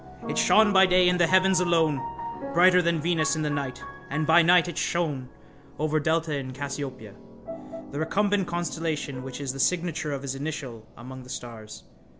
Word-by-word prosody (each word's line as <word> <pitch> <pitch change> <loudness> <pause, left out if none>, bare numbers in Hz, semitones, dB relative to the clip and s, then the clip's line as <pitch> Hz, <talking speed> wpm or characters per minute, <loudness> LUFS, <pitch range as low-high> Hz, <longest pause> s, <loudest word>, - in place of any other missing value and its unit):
It - - -3
shone 215 -1 +4
by 190 0 +6
day 180 0 +4
in 180 0 0
the 175 - +4
heavens 185 +1 +4
alone, 165 -4 +1 0.5
brighter 180 +1 +6
than 170 -1 0
Venus 155 -3 +1
in 155 - -2
the 150 - -1
night, 140 -2 -4 0.3
and 155 +2 -1
by 160 +2 +6
night 175 +1 +4
it 175 - -6
shone 150 -8 -2 0.5
over 155 0 0
delta 160 0 0
in 130 -2 -5
Cassiopeia, 140 -1 -6 0.8
the 140 - -5
recumbent 195 +4 0
constellation 160 -5 -3
which 130 0 -8
is 135 -2 -4
the 135 - -8
signature 165 -1 -1
of 140 -1 -4
his 135 -1 -3
initial 135 -6 -6
among 130 +2 -10
the 125 - -14
stars. 115 -4 -9
155 Hz, 175 wpm, -26 LUFS, 140-175 Hz, 0.8 s, by